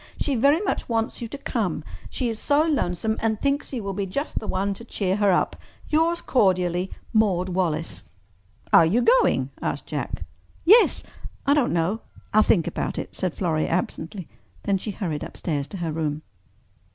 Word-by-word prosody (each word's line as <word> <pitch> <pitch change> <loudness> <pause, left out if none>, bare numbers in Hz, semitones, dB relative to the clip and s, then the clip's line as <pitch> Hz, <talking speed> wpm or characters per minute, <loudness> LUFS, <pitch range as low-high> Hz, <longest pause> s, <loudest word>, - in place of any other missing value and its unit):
She 285 - 0
very 280 +7 +4
much 405 - -2
wants 225 0 -1
you 235 - -3
to 285 - -7
come—she 225 - -3
is 225 -2 -3
so 290 +1 +3
lonesome 220 - 0
and 220 -1 0
thinks 280 +1 0
you 245 -5 -3
will 195 0 -3
be 195 0 -2
just 280 +11 -2
the 215 - -7
one 195 +2 0
to 215 - -11
cheer 195 -4 -1
her 205 -2 +4
up. 180 - +1 0.3
"Yours 330 +2 +2
cordially, 185 -5 +2 0.2
"Maude 190 -5 +2
Wallace." 175 -3 -1 0.7
"Are - - +9
you 200 +10 +2
going?" - - +3
asked - - -2
Jack. - - -4 0.4
"Yes—I 390 -7 +3
don't 290 -4 +2
know—I'll 200 +4 0
think 185 -5 +3
about 175 - -3
it," - - -5
said 185 -3 -1
Florrie 160 -4 0
absently. 175 +1 -3 0.4
Then 195 -1 +1
she 215 - -5
hurried 175 -7 -3
upstairs 145 -5 -3
to 195 - -7
her 170 -3 -2
room. 155 -1 -2
200 Hz, 165 wpm, -24 LUFS, 175-245 Hz, 0.7 s, Are